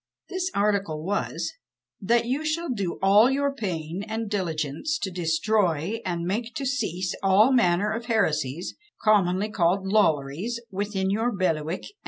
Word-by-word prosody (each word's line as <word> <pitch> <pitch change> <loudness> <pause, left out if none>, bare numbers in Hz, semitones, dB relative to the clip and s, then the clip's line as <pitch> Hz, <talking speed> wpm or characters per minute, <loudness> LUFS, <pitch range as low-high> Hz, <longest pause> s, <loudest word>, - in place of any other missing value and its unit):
This 370 0 -2
article 200 -7 0
was, 200 +4 -2 0.5
"That 235 +4 +2
you 265 +6 -1
shall 315 +2 -1
do 200 -8 -2
all 205 +5 +6
your 280 +1 0
pain 180 - -4
and 220 -1 -4
diligence 170 - -1
to 190 - -4
destroy 180 +2 0
and 170 -2 -2
make 225 +7 -3
to 275 - -3
cease 185 - -1
all 200 +6 +5
manner 205 -3 +3
of 225 +1 -4
heresies, 175 - 0 0.3
commonly 205 -1 +3
called 190 0 +1
Lollaries, 190 - +1
within 195 -1 -1
your 225 +4 +1
bailiwick, 170 -4 -1
&c." - - -10
200 Hz, 145 wpm, -25 LUFS, 175-230 Hz, 0.5 s, all